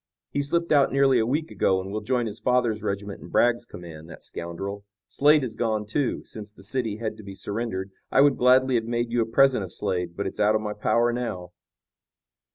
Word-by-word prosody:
"He 145 - 0
slipped 170 +4 -1
out 145 -2 +4
nearly 135 -2 +4
a 110 - +1
week 155 +5 -1
ago, 95 -1 +2
and 95 +1 -6
will 105 +1 -3
join 120 +2 0
his 110 0 -6
father's 120 -4 +1
regiment 100 0 -4
in - - -10
Bragg's 120 0 +2
command. 80 -2 -10
That - - -11
scoundrel, 95 +4 -6 0.2
Slade, 150 +1 +4
is 115 -4 -4
gone 110 -2 -1
too. 125 +6 -1
Since 105 -1 -8
the 100 - -15
city 110 -1 -2
had 110 -1 -4
to 110 - -11
be 100 -1 -9
surrendered 100 -2 -4 0.2
I 135 - +4
would 140 -1 +5
gladly 130 +1 +4
have 115 -2 +1
made 120 0 -2
you 120 0 +2
a 110 - 0
present 130 -1 +4
of 90 - -7
Slade, 90 -1 -3
but 100 - -2
it's 95 - -5
out 105 +1 +4
of 110 - +1
my 105 -1 -3
power 115 +3 +1
now." 95 -8 -4
110 Hz, 220 wpm, -25 LUFS, 100-125 Hz, 0.2 s, would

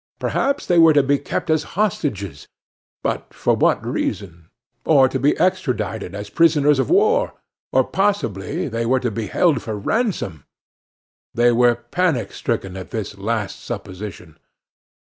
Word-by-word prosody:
Perhaps 280 0 -1
they 175 -1 +3
were 165 -1 +7
to 145 -1 +4
be 140 +1 +2
kept 150 +3 -3
as 155 -1 +3 0.2
hostages 105 - -2 0.6
but - - -3
for - - +1
what - - +2
reason? 85 -5 -4 0.3
or 140 -4 +5
to 130 +1 -3
be 140 +4 +2
extradited 110 - -1
as 105 0 -7
prisoners 150 -4 +4
of - - 0
war? 430 +7 +3 0.4
or - - +4
possibly 115 - -1
they 115 +1 -2
were 130 +3 +2
to 125 -2 -2
be 110 0 -4
held 155 - +2
for 110 -2 -4
ransom? 105 - -2 0.9
They 120 +1 +4
were 120 0 +4
panic 140 +5 -1
stricken 95 -1 -3
at 95 - -8
this 110 -3 -5
last 105 -1 -2
supposition. 90 -4 -8
120 Hz, 145 wpm, -21 LUFS, 100-160 Hz, 0.9 s, were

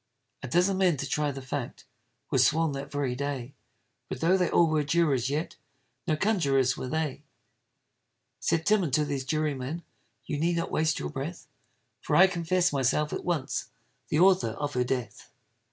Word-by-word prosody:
A 125 - -5
dozen 180 +8 +2
men 180 -5 +3
to 145 - -3
try 150 +2 0
the 135 -1 -6
fact, 130 -1 -5 0.5
Were 135 - +2
sworn 155 +5 +3
that 140 0 -6
very 140 -3 -1
day; 140 -1 -4 0.6
But - - -4
tho' 170 +6 +3
they 180 -2 +1
all 170 - +4
were 155 -1 +1
jurors, 140 -4 +1
yet 150 +4 -3 0.5
No 155 - +2
conjurors 140 - +2
were - - -5
they. 155 -1 -2 1.2
Said 160 -1 0
Tim 215 -1 +4
unto 150 -3 +1
those 140 -2 -3
jurymen, 155 +1 -2 0.4
You 145 - -3
need 170 +2 +1
not 170 - -2
waste 155 0 +1
your 75 - -4
breath, - - -6 0.6
For - - -1
I 190 - +8
confess 180 -2 +1
myself 140 +3 +1
at - - -4
once 165 -7 -2 0.4
The - - 0
author 180 - +4
of 145 0 -3
her 125 - +1
death. 125 -4 -4
150 Hz, 170 wpm, -28 LUFS, 135-170 Hz, 1.2 s, I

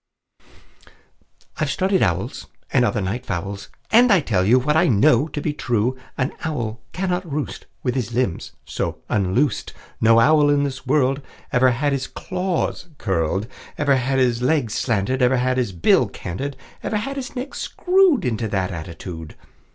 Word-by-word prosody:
"I've 155 - 0
studied 190 +5 +1
owls, 95 +5 -1 0.3
And 125 - +4
other 120 -3 +1
night 100 +7 -3
fowls, 100 0 -4 0.2
And 240 +1 +6
I 195 - +6
tell 105 - +1
you 115 +7 +5
What 150 +4 +1
I 160 - +4
know 120 +4 +4
to 150 - -5
be 150 0 -2
true: 120 -2 0 0.2
An 130 +1 -1
owl 120 -8 -3
cannot 180 -2 -2
roost 145 0 -4 0.2
With 125 - 0
his 120 -4 -2
limbs 120 -7 -1
so - - -3
unloosed; 110 +7 0 0.3
No 115 +1 +6
owl 150 +4 +5
in 145 0 +3
this 135 -2 -4
world 135 0 +2 0.3
Ever 130 -1 +4
had 140 +4 0
his 135 -1 -2
claws 180 -1 -3
curled, 95 0 0 0.3
Ever 145 -2 +3
had 130 +1 0
his 125 -2 +2
legs 125 -4 +1
slanted, 120 +3 0
Ever 125 +1 +4
had 130 +1 +1
his 125 -6 0
bill 85 -3 +3
canted, 135 +10 -5 0.2
Ever 215 - -1
had 275 +6 -3
his 270 -1 -6
neck 260 +2 -5
screwed 365 - +2
Into 115 -2 -1
that 95 -3 -1
attitude. 80 -1 -7
130 Hz, 165 wpm, -22 LUFS, 110-150 Hz, 0.3 s, And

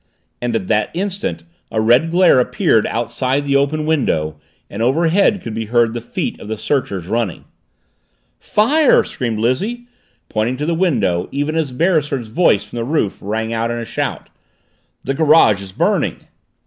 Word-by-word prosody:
And 120 -1 -1
at 105 -4 -1
that 105 -1 +1
instant 200 +5 -3 0.3
a 110 - -1
red 120 +8 +3
glare 175 -5 +5
appeared 125 - +2
outside 130 +4 -1
the 140 -1 +1
open 145 +2 +1
window 80 - 0 0.3
and 100 - -6
overhead 170 - +2
could 115 - -5
be 110 0 -3
heard 115 0 +2
the 120 - -4
feet 120 - -4
of - - -10
the 110 0 -4
searchers, 105 - -2
running. 110 -1 -2 0.9
"Fire!" 280 +8 +3
screamed 115 -3 -4
Lizzie, 195 - -1 0.4
pointing 110 +4 -1
to 150 - -3
the 170 - 0
window, 140 - 0
even 145 +3 -2
as 160 -5 -1
Beresford's 145 -5 0
voice 110 - +2
from - - -10
the 115 - -1
roof 130 -6 -1
rang 110 +3 -3
out 115 +1 -1
in 120 - -2
a 115 - -4
shout. - - -4 0.7
"The 135 - -1
garage 145 -9 +4
is 95 -1 -9
burning!" - - 0
125 Hz, 165 wpm, -18 LUFS, 110-160 Hz, 0.9 s, glare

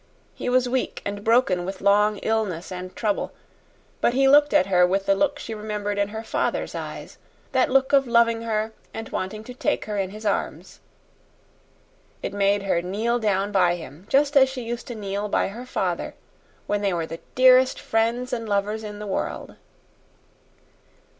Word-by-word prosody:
He - - -4
was 250 0 +3
weak 255 +1 -2
and 205 0 -4
broken 225 -6 +3
with 190 +1 -5
long 210 +1 +3
illness 205 -7 -1
and 185 0 -7
trouble, 210 -3 -1 0.7
but 240 - +2
he 270 0 +4
looked 290 +2 +6
at 185 - +4
her 180 -2 +3
with 195 +2 +2
the 195 - +4
look 290 +8 +1
she 230 - -6
remembered 210 -1 -3
in 200 - +2
her 220 +2 -6
father's - - -2
eyes - - -7 0.3
that 260 -1 +2
look 265 +1 +2
of 275 -2 +5
loving 235 -1 +3
her 220 -1 -1 0.2
and 225 0 -6
wanting 215 +3 -4
to 250 - -9
take 245 - -1
her 210 -1 -3
in 190 -1 -1
his 215 +2 -10
arms. 205 - -2 1.4
It - - -3
made 200 0 +2
her 180 -3 +1
kneel 220 +7 -1
down 205 -2 0
by 180 -3 +3
him, 165 +2 -11
just 285 +2 +3
as 265 -1 +6
she 260 -2 -6
used 235 +2 -5
to 240 - -6
kneel 205 0 -3
by - - +1
her 240 +5 -9
father - - -2 0.5
when 205 0 -1
they 200 -2 +1
were 165 -1 -1
the 165 +1 -8 0.2
dearest 255 0 +5
friends 235 +3 0
and 230 -2 -3
lovers 205 +2 -1
in 210 -1 -7
the 210 - -7
world. 195 - -4
215 Hz, 180 wpm, -24 LUFS, 195-245 Hz, 1.4 s, looked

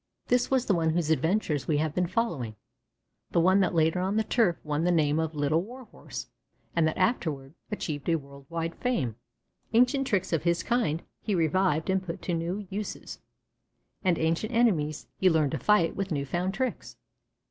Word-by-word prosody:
This 245 0 +3
was 260 -2 +2
the 200 - +2
one 165 -2 +2
whose 160 -1 +1
adventures 160 -2 +1
we 150 - +2
have 155 0 0
been 180 +1 +1
following, 165 - -2 0.7
the - - +2
one 185 +3 +5
that 185 -2 +1
later 160 +2 +3
on 190 +3 0
the 220 - +3
turf 220 -7 +2
won 150 +1 -1
the 175 - +2
name 155 -2 +2
of 160 -1 -2
Little 150 +3 +2
Warhorse 245 +5 -9 0.5
and 165 -2 +3
that 160 - -2
afterward 160 - 0 0.2
achieved 155 -7 -3
a 165 - +4
world 140 -2 -9
wide 165 0 -2
fame. 145 - -1 0.6
Ancient 250 +3 +3
tricks 190 -6 0
of 165 - +2
his 170 0 +1
kind 225 -10 0 0.2
he 210 - -1
revived 165 -1 +2
and 190 0 +1
put 175 -2 -6
to 175 - -1
new 175 +5 -2
uses, 205 +2 -5 0.8
and 180 -4 +3
ancient 165 +8 0
enemies 170 -11 +2
he 190 - +5
learned 155 -4 +2
to - - -2
fight 210 -6 +3
with 195 -1 -3
new 140 -3 -1
found 180 +6 -2
tricks. 260 -1 -3
170 Hz, 185 wpm, -28 LUFS, 155-200 Hz, 0.8 s, one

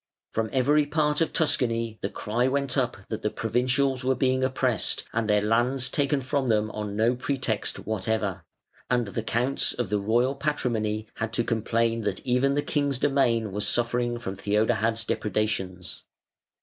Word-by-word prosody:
From 110 0 -1
every 145 +3 +3
part 150 0 +1
of 165 - +1
Tuscany 115 -7 +1
the 100 - -1
cry 120 +6 -1
went 140 0 0
up 125 -4 0
that 110 0 -4
the 105 - 0
provincials 125 +4 0
were 130 +1 +2
being 130 0 +1
oppressed 130 -3 0
and 110 -1 -1
their 105 0 +3
lands 125 +4 +1
taken 140 -1 +1
from 135 +1 -1
them 110 -1 +1
on 105 -1 -4
no 115 +3 +2
pretext 125 -4 -2
whatever; 105 -3 -2 0.5
and 120 -1 +2
the 100 - -3
Counts 120 +5 +1
of 120 -5 -3
the 105 - +2
Royal 120 +6 +2
Patrimony 115 -7 -1
had 115 -1 -2
to 120 - +2
complain 115 0 0
that 105 -3 -3
even 130 +2 +2
the 145 - +1
king's 145 -3 0
domain 120 -6 +1
was 105 +2 -1
suffering 120 0 0
from 100 -5 -5
Theodahad's 105 +3 +1
depredations. 95 -4 -2
120 Hz, 160 wpm, -26 LUFS, 110-130 Hz, 0.5 s, every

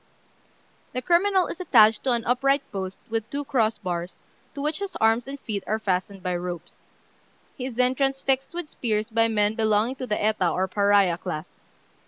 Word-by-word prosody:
The 255 - -2
criminal 370 +2 +3
is - - -7
attached 220 -11 +5
to 255 - +3
an 235 -1 -1
upright 275 +3 +2
post 190 -1 -4
with 225 -1 -2
two 285 0 -4
cross 230 -5 +1
bars, 175 -2 -5 0.3
to - - -6
which 305 +3 -1
his 400 -2 -5
arms 225 +2 +2
and 280 +1 -6
feet 210 -6 -4
are 215 - +1
fastened 195 -2 -2
by 180 -1 -1
ropes. 175 -1 -6 0.8
He 255 - -4
is 255 - -7
then 250 +1 +3
transfixed 270 +2 0
with 350 -3 -4
spears 220 -5 -2
by 225 0 +3
men 210 -1 +1
belonging 220 +3 +1
to 255 - -5
the 210 - -1
Eta 210 -4 +2
or 185 +3 0
Pariah 200 -3 +3
class. 170 -3 -5
225 Hz, 185 wpm, -25 LUFS, 200-270 Hz, 0.8 s, attached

